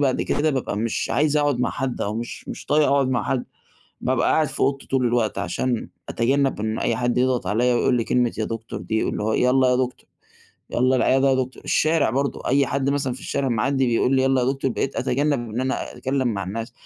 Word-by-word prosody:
بعد 135 -3 +1
كده 155 +1 +1
بابقى 130 -7 -2
مش 115 +2 -2
عايز 150 +1 +2
اقعد 145 -4 +1
مع - - +1
حد 135 -2 -3
أو 105 +1 -2
مش 120 +2 -6
مش - - -7
طايق 150 0 +3
اقعد 140 -1 +2
مع 125 -4 0
حد، 130 -2 -1 0.6
بابقى - - +1
قاعد 155 -2 +2
في - - -4
اوضتي 140 0 0
طول 130 -2 +1
الوقت 120 -2 0
عشان 115 +7 -2 0.2
أتجنَّب 135 0 +1
إن 110 +1 -2
أي 115 - 0
حد 120 0 0
يضغط 125 -1 +1
عليَّا 120 +4 +2
ويقول 125 - +2
لي 115 - 0
كلمة 125 -1 +1
يا 110 - 0
دكتور 115 +1 -5
دي، 110 -1 -1
اللي - - -2
هو 110 - 0
"يالَّا 130 +2 +3
يا 125 - +3
دكتور، 125 0 -3 0.6
يالَّا 130 +2 +2
العيادة 135 +2 +3
يا - - +3
دكتور." 130 0 -3
الشارع 155 -6 +2
برضه 140 +3 -2
أي 140 +1 +3
حد 140 0 0
مثلًا 135 -3 -1
في 130 - -10
الشارع 140 -2 -2
معدّي 130 +3 +1
بيقول 125 +3 +2
لي: 130 - +3
"يالَّا 135 -1 +2
يا - - 0
دكتور." 135 -1 -2
بقيت 135 +3 -2
اتجنب 135 -3 0
إن 115 +4 -3
أنا 130 +1 -2
اتكلِّم 130 -1 -1
مع 100 -3 -2
الناس، 115 +5 -5
130 Hz, 225 wpm, -23 LUFS, 120-135 Hz, 0.6 s, طايق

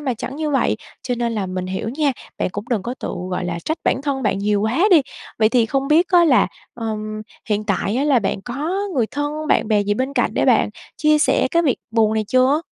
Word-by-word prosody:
mà 265 -4 -1
chẳng 265 +5 -6
như 310 -1 -2
vậy, 270 - +1 0.3
cho 250 - -2
nên 235 -1 -1
là 205 -4 -2
mình 185 0 -4
hiểu 190 +3 -3
nha, 280 +3 0 0.3
bạn - - 0
cũng 205 +2 -5
đừng 225 -6 0
có 240 +4 -4
tự, - - -4 0.2
gọi 180 - -2
là, 170 -1 -3
trách 315 - -2
bản 265 - +1
thân 275 -2 -2
bạn 210 -4 0
nhiều 205 0 +1
quá 235 - +1
đi. 320 -6 +7 0.4
Vậy 215 -1 +4
thì 230 0 +2
không 270 +3 -1
biết 325 +4 +4
á 350 -2 +5
là, 270 -6 +4 0.3
ừm, 215 -2 -4 0.3
hiện 210 0 0
tại 200 +2 -1
á 275 - +1
là 280 -4 +4
bạn 195 -2 -2
có 280 - -3 0.2
người 235 -4 +2
thân, 295 +3 -3
bạn - - +2
bè 210 -2 +3
gì 205 +1 0
bên 260 +5 -2
cạnh - - +1
để - - +1
bạn - - +4 0.3
chia 305 0 +3
sẻ - - +2
cái 335 -1 +3
việc 275 -6 +2
buồn 220 -1 +2
này 220 -1 0
chưa? 260 +4 +3
245 Hz, 250 wpm, -20 LUFS, 215-290 Hz, 0.4 s, đi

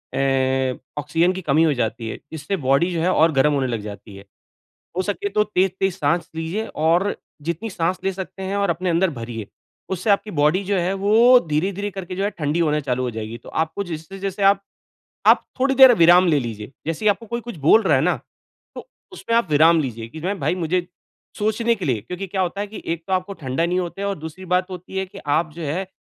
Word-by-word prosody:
ए 130 -1 +1 0.3
oxygen 165 +5 +1
की 190 - -5
कमी 155 -1 +3
हो 160 -2 +3
जाती 115 -2 -2
है। - - -5
इससे 160 +5 -3
बॉडी 140 +7 +3
जो 165 - -1
है 180 +3 +2
और 160 -1 +4
गरम 145 +1 +3
होने 135 -2 0
लग 115 -3 -3
जाती 105 0 -9
है। 100 0 -12 0.7
हो - - +2
सके 205 +1 -2
तो 210 +1 +2
तेज-तेज 190 -2 0
साँस 170 +4 0
लीजिए 165 +7 -3 0.2
और 175 +5 +2 0.3
जितनी 170 +8 -3
साँस 180 -1 -1
ले 195 - +1
सकते 190 0 -7
हैं 195 +1 -2
और 200 0 +1
अपने 185 0 -1
अंदर 175 +2 +2
भरिए, 115 -3 -6 0.4
उससे 190 +3 -2
आपकी 205 +1 +2
बॉडी 150 +7 +3
जो 200 +1 -1
है 180 +2 0
वो 225 +6 +5
धीरे-धीरे 195 +7 -1
करके 185 -2 -6
जो 195 - -2
है 205 - +1
ठंडी 150 +1 -1
होना 150 -2 +2
चालू 130 -3 -2
हो 125 - -2
जाएगी। 110 +1 -6
तो - - -14
आपको 160 +5 -2
जैसे-जैसे 195 +4 -5
आप 195 0 +5 0.7
आप - - +6
थोड़ी 270 +1 +2
देर 260 -1 +9
विराम 175 -1 +6
ले 155 -3 +4
लीजिए, 110 -1 -6
जैसे 165 +5 -3
ही - - +5
आपको 215 +3 -3
कोई 235 +2 -3
कुछ 235 -4 -8
बोल 220 +9 +6
रहा 175 -7 +3
है - - +2
ना? 180 +3 +2 0.6
तो - - -9 0.2
उसमें 230 -10 -2
आप 230 -8 +2
विराम 160 +3 +5
लीजिए 115 -4 -5
कि 160 - -9
ना 185 +4 -1
भई 185 -2 -1
मुझे 175 +1 -1 0.5
सोचने 220 +2 +1
के 195 -5 -5
लिए 120 -7 0
क्योंकि 180 - -6
क्या 190 +1 -2
होता 185 +2 -2
है 205 - -3
कि 215 - -9
एक 165 0 -8
तो 190 - -1
आपको 185 +2 -1
ठंडा 160 -1 -2
नहीं 180 +1 0
होते 180 +3 -4
और 200 -1 -1
दूसरी 160 +4 -9
बात 180 +1 +1
होती 185 +1 -8
है 190 - 0
कि 190 +2 -14 0.2
आप 155 0 0
जो 170 - -8
है 170 +6 -2
175 Hz, 230 wpm, -22 LUFS, 150-195 Hz, 0.7 s, देर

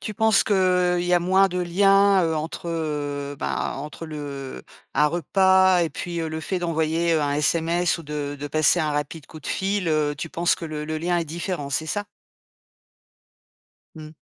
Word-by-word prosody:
Tu 215 - -5
penses 220 0 +3
qu'il 205 - +1 0.5
y 180 0 +2
a - - +5
moins 190 +2 +4
de 180 0 -3
liens, 195 +2 +4
heu, 160 - 0
entre, 160 +2 -5
heu, 145 -3 -3
ben, - - -2
entre 150 +4 -7
le, 155 -1 -7
heu, 140 - -7 0.3
un 150 - +3
repas 190 +2 +3
et 165 - 0
puis, 170 +3 -5
heu, 160 - -2
le 160 0 -4
fait 185 +3 -2
d'envoyer, 165 0 0
heu, 155 - +2
un 145 -1 0
SMS 165 +3 +1
ou 165 - -9
de 145 -1 -4
de 145 - -5
passer 155 +4 +3
un 155 -2 0
rapide 145 0 -4
coup 155 - -12
de - - -10
fil, 195 -2 -1
heu, 150 -1 +1
tu 160 +3 -6
penses 170 +2 +1
que 165 - -6
le 150 -1 -5
le 155 +1 -3
lien 175 +2 0
est 170 - -1
différent, 165 -2 -4
c'est 155 +3 -1
ça? 205 +5 -2 1.9
Mmh. 155 0 -10
165 Hz, 200 wpm, -23 LUFS, 150-180 Hz, 1.9 s, a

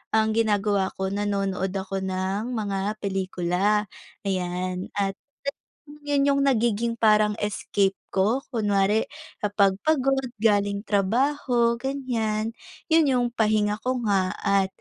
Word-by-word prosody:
ang 220 0 +3
ginagawa 205 -3 +1
ko, 190 0 -2
nanonood 195 -2 -1
ako 195 0 -3
ng 190 +5 -2
mga 205 -1 -2
pelikula, 190 +1 0 0.4
ayan, 185 -1 -2
at 195 -1 -1 0.8
yun 285 -1 +2
yung 280 0 +3
nagiging 235 -3 +1
parang 215 -1 +4
escape 200 -1 0 0.2
ko. 220 +8 +1
Kunwari 210 -1 +1 0.3
kapag 200 -2 +2
pagod 270 -4 +2
galing 205 -1 +1
trabaho 235 +3 +1
ganyan, 230 -5 -2 0.4
yun 320 -2 +5
yung 250 -2 +2
pahinga 215 -2 +1
ko 255 +2 -1
nga 195 -3 +1
at 200 -1 +2
210 Hz, 115 wpm, -25 LUFS, 195-235 Hz, 0.8 s, yun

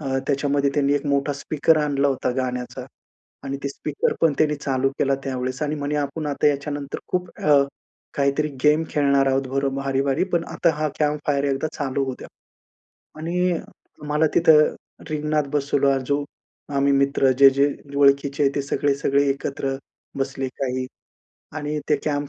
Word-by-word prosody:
अ, 135 -2 -1
त्याच्यामध्ये 140 0 +1
त्यांनी 140 -1 +2
एक 145 - -1
मोठा 140 0 +1
स्पीकर 155 +3 +1
आणला 145 -1 +1
होता 135 -2 -1
गाण्याचा 125 -1 -3 0.6
आणि 135 0 -3
ते 140 - -1
स्पीकर 145 +1 -2
पण 165 -2 +4
त्यांनी 150 -1 +2
चालू 135 -2 0
केला 135 -1 +2
त्यावेळेस 130 0 -3
आणि 150 0 -1
म्हणे 145 0 -2
आपण 145 +2 -2
आता 145 0 0
याच्यानंतर 145 0 -3
खूप 180 -1 -1
अ, 145 -2 +5 0.5
काहीतरी 140 +2 +1 0.2
गेम 150 +2 +5
खेळणार 140 -2 +2
आहोत 135 0 +1
बरं 135 +1 -1
भारी-भारी 135 +2 0
पण 170 -1 +1
आता 170 - +3
हा 155 0 0
कॅम्प 150 -1 +1
फायर 140 -1 +2
एकदा 140 +2 0
चालू 140 -1 -1
होऊ 130 -1 -4
द्या. - - -10 0.9
आणि 175 +2 0 0.5
मला 150 +2 +3
तिथं 155 -3 +5 0.4
रिंगणात 150 0 0
बसवला. 140 -1 +2
जो 145 0 +1 0.5
आम्ही 140 0 +3
मित्र 140 -1 +3
जे-जे 140 +1 +6 0.3
ओळखीचे 140 0 +3
आहेत 140 0 +1
ते 140 - +1
सगळे-सगळे 140 0 +1
एकत्र 135 0 -2 0.4
बसले 135 0 -2
काही 130 -1 -1 0.7
आणि 150 0 -3
ते 150 - +4
कॅम्प 145 -1 -1
140 Hz, 155 wpm, -23 LUFS, 135-150 Hz, 0.9 s, जे-जे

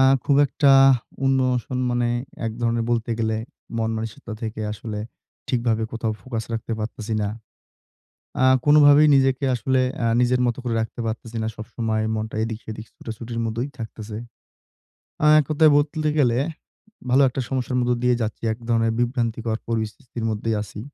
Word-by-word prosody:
আ - - +6 0.2
খুব 140 - +3
একটা 140 +1 +3 0.5
ইমোশন 130 -1 +1
মানে 120 0 +1 0.4
একধরনের 115 +1 -1
বলতে 120 0 0
গেলে 110 -1 0 0.4
মনমানসিকতা 110 0 -3
থেকে 110 -1 -4
আসলে 105 0 -6 0.5
ঠিকভাবে 115 -3 +1
কোথাও 115 -1 -2
ফোকাস 115 -4 -4
রাখতে 115 0 -3
পারতেছি 110 0 -4
না। 100 - 0 1.1
আ - - +5 0.2
কোনোভাবেই 145 0 +7
নিজেকে 135 0 +2
আসলে 130 +2 +1 0.2
আ - - +2
নিজের 125 0 +2
মত 120 -1 0
করে 120 -2 -2
রাখতে 110 +2 -4
পারতেছি 115 +1 -5
না। - - -1
সবসময় 110 0 -2
মনটা 110 0 -4
এদিক 110 -1 -3
সেদিক 110 0 -7
ছুটাছুটির 115 +1 -6
মতোই 115 +5 -2
থাকতেছে। 110 -2 -7 1.1
আ - - +5
এককথায় 155 +2 +4
বলতে 150 +1 +1
গেলে, 125 -4 +3 0.7
ভালো 135 +3 +5
একটা 130 - -3
সমস্যার 130 -1 -2
মধ্যে 125 0 +1
দিয়ে 125 0 +4
যাচ্ছি। 110 -1 -3
একধরনের 115 -1 0
বিভ্রান্তিকর 115 -2 -1
পরিস্থিতির 115 +2 -4
মধ্যেই 110 +1 -1
আছি। 105 0 -9
115 Hz, 145 wpm, -23 LUFS, 110-125 Hz, 1.1 s, কোনোভাবেই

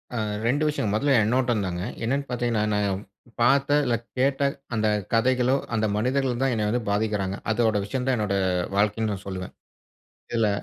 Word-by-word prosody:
அ - - -1 0.3
2 145 +5 +2
விஷயம். 145 -9 -1
முதல்ல 135 +6 +2
என்னோட 125 +3 +2
தாங்க. 90 -1 -3 0.2
என்னன்னு 140 +5 0
பாத்தீங்கன்னா 120 -3 0
நான் 100 -2 0 0.4
பார்த்த, 140 +4 +4
இல்ல 120 -2 +2 0.2
கேட்ட 135 +2 +2 0.3
அந்த 110 -1 +1 0.3
கதைகளோ, 125 +2 +3 0.2
அந்த 110 0 +1
மனிதர்களோ 125 +3 +1
தான் 135 -2 +2
என்ன 105 -2 0
வந்து 120 +3 0
பாதிக்குறாங்க. 100 -2 0 0.2
அதோட 110 -1 +2
விஷயம் 125 +5 -3
தான் 130 - +3
என்னோட 105 -2 0 0.4
வாழ்க்கைன்னு 105 0 +1
சொல்லுவேன். 95 -1 -5 0.8
இதுல 115 -2 +2
115 Hz, 150 wpm, -25 LUFS, 105-130 Hz, 0.8 s, பார்த்த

